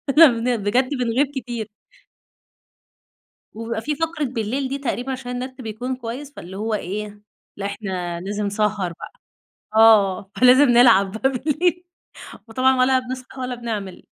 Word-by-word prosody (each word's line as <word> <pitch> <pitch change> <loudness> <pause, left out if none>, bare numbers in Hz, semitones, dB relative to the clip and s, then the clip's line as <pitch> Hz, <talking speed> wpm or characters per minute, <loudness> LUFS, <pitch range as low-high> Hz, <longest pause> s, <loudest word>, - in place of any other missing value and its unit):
كن 250 -6 +5
بجد 245 +6 +1
بنغيب 255 0 0
كتير. 240 -4 -4 1.9
وبيبقى 225 0 -4
في 295 +6 -2
فقرة 325 0 -2
بالليل 250 +1 -2
دي، 275 - -2
تقريبًا 265 -1 -3
عشان 255 -1 -5
النت 255 +1 -6
بيكون 245 +3 -4
كويس، 255 +4 -7
فاللي 185 +3 -9
هو 220 +2 -2
إيه؟ 210 +1 -4 0.4
لأ 200 - -4
إحنا 185 -4 -4
لازم 205 +2 -3
سهر 205 -3 -1
بقى، - - -9 0.6
آه 205 -4 +5
فلازم 255 +3 +7
نلعب 235 -5 +5
بقى 245 +5 0
بالليل 315 +7 0 0.6
وطبعًا 255 +3 +2
ولا 260 +1 +4
بنصحى 255 +1 -8
ولا 250 0 -3
بنعمل. 215 -6 -6
240 Hz, 135 wpm, -22 LUFS, 210-260 Hz, 1.9 s, فلازم